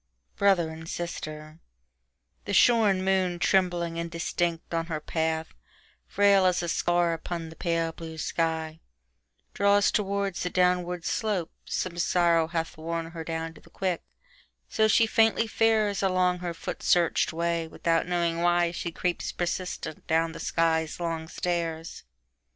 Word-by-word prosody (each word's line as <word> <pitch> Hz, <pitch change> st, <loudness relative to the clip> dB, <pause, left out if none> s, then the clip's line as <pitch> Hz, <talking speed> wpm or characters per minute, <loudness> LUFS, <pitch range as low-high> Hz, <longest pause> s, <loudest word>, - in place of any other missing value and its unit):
Brother 190 Hz, -5 st, +3 dB
and 160 Hz, +1 st, -9 dB
Sister 155 Hz, -2 st, -6 dB, 0.9 s
THE 200 Hz, -, -1 dB
SHORN 210 Hz, -5 st, +4 dB
moon 185 Hz, -2 st, +1 dB
trembling 175 Hz, -2 st, +1 dB
indistinct 170 Hz, 0 st, -2 dB
on 165 Hz, 0 st, -1 dB
her 160 Hz, -3 st, -3 dB
path, 160 Hz, +1 st, -2 dB, 0.5 s
Frail 200 Hz, -1 st, +4 dB
as 180 Hz, -1 st, +1 dB
a -, -, -2 dB
scar 175 Hz, 0 st, +1 dB
upon 165 Hz, 0 st, -5 dB
the 160 Hz, -, -12 dB
pale 165 Hz, -1 st, -1 dB
blue 160 Hz, 0 st, -9 dB
sky, 160 Hz, 0 st, -2 dB, 0.7 s
Draws 200 Hz, 0 st, +3 dB
towards 200 Hz, -2 st, -1 dB
the 180 Hz, -, -1 dB
downward 180 Hz, -1 st, +1 dB
slope: 205 Hz, -7 st, -1 dB
some 175 Hz, -2 st, -3 dB
sorrow 170 Hz, -2 st, +3 dB
hathWorn 165 Hz, 0 st, -3 dB
her 165 Hz, -1 st, -6 dB
down 165 Hz, 0 st, -4 dB
to 150 Hz, -, -16 dB
the -, -, -19 dB
quick, 180 Hz, 0 st, -2 dB, 0.7 s
so 220 Hz, 0 st, +2 dB
she 225 Hz, +1 st, +5 dB
faintly 225 Hz, 0 st, +3 dB
faresAlong 195 Hz, -5 st, +2 dB
her 175 Hz, -1 st, -4 dB
foot -, -, -6 dB
searched 175 Hz, -2 st, +2 dB
way 170 Hz, 0 st, -1 dB
without 165 Hz, +1 st, 0 dB
knowing 170 Hz, -2 st, 0 dB
whyShe 175 Hz, 0 st, +1 dB
creeps 180 Hz, -1 st, -2 dB
persistent 175 Hz, -2 st, -4 dB
down 165 Hz, 0 st, +2 dB
the -, -, -9 dB
sky's 160 Hz, -1 st, 0 dB
long 165 Hz, -2 st, -3 dB
stairs. 165 Hz, -, -3 dB
170 Hz, 135 wpm, -27 LUFS, 165-185 Hz, 0.9 s, she